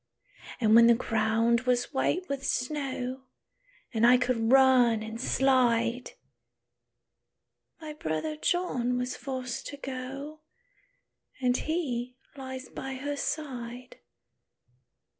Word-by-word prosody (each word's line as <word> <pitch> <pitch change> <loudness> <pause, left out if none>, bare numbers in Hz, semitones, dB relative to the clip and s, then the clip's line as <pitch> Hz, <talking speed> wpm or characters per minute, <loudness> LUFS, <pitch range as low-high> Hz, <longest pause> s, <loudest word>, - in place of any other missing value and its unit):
"And 220 -3 +3
when 230 +1 +8
the 235 - +6
ground 225 +1 +1
was 250 +3 +1
white 355 +7 0
with 275 -1 -4
snow, 260 -1 -3 0.7
And 225 -1 0
I 245 +1 +7
could 245 -2 0
run 255 -4 +5
and 220 +2 -6
slide, 250 -2 +2 1.7
My 310 -2 -7
brother 230 - -3
John 255 -8 0
was 250 +1 -2
forced 255 -3 -5
to 285 - -7
go, 270 +3 -7 1.0
And 250 -1 +2
he 255 -6 -2 0.2
lies 260 -1 -7
by 265 0 -6
her 285 +2 -4
side." 255 -4 -5
255 Hz, 105 wpm, -28 LUFS, 235-270 Hz, 1.7 s, when